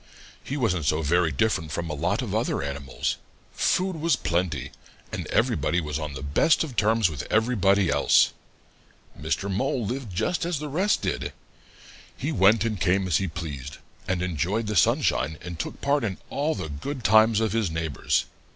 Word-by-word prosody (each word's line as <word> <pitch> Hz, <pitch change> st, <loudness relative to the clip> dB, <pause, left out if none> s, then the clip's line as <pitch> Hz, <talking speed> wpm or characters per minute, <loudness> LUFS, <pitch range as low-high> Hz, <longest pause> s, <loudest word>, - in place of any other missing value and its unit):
He 140 Hz, -, -4 dB
wasn't 90 Hz, -, 0 dB
so 75 Hz, +3 st, +1 dB
very 85 Hz, +2 st, +2 dB
different 80 Hz, 0 st, 0 dB
from 85 Hz, +2 st, -3 dB
a 75 Hz, -, -3 dB
lot 90 Hz, -, -1 dB
of 105 Hz, -5 st, -4 dB
other 110 Hz, -, 0 dB
animals. 70 Hz, -1 st, -3 dB, 0.4 s
Food 185 Hz, -1 st, +1 dB
was 165 Hz, +1 st, +2 dB
plenty, 80 Hz, -6 st, -1 dB, 0.4 s
and -, -, -4 dB
everybody 85 Hz, -, +1 dB
was 75 Hz, -2 st, -3 dB
on 75 Hz, -2 st, -4 dB
the 65 Hz, -, -6 dB
best 70 Hz, -, +3 dB
of 140 Hz, -6 st, -7 dB
terms 110 Hz, -1 st, +3 dB
with 80 Hz, -3 st, -5 dB
everybody 100 Hz, -4 st, +3 dB
else. -, -, +4 dB, 0.8 s
Mr. 100 Hz, -, -2 dB
Mole 115 Hz, +4 st, -1 dB
lived 125 Hz, 0 st, -4 dB
just 110 Hz, -, -1 dB
as 170 Hz, -1 st, -1 dB
the 150 Hz, +1 st, -5 dB
rest 190 Hz, +8 st, +1 dB
did. -, -, -2 dB, 0.8 s
He -, -, -2 dB
went 100 Hz, +4 st, +4 dB
and 110 Hz, -5 st, -2 dB
came 95 Hz, +2 st, +2 dB
as 90 Hz, -5 st, +2 dB
he 95 Hz, -, -1 dB
pleased, 75 Hz, -5 st, -6 dB, 0.3 s
and 90 Hz, -1 st, 0 dB
enjoyed 90 Hz, +6 st, -1 dB
the 105 Hz, 0 st, -2 dB
sunshine 80 Hz, -1 st, +2 dB
and 85 Hz, -1 st, -8 dB
took -, -, -5 dB
part 140 Hz, -1 st, +1 dB
in 100 Hz, -4 st, -2 dB
all 150 Hz, +3 st, 0 dB
the 90 Hz, -4 st, -4 dB
good 120 Hz, -, -5 dB
times 110 Hz, 0 st, +5 dB
of 110 Hz, -3 st, 0 dB
his 110 Hz, -5 st, +1 dB
neighbors. 80 Hz, -2 st, -1 dB
95 Hz, 180 wpm, -25 LUFS, 80-115 Hz, 0.8 s, times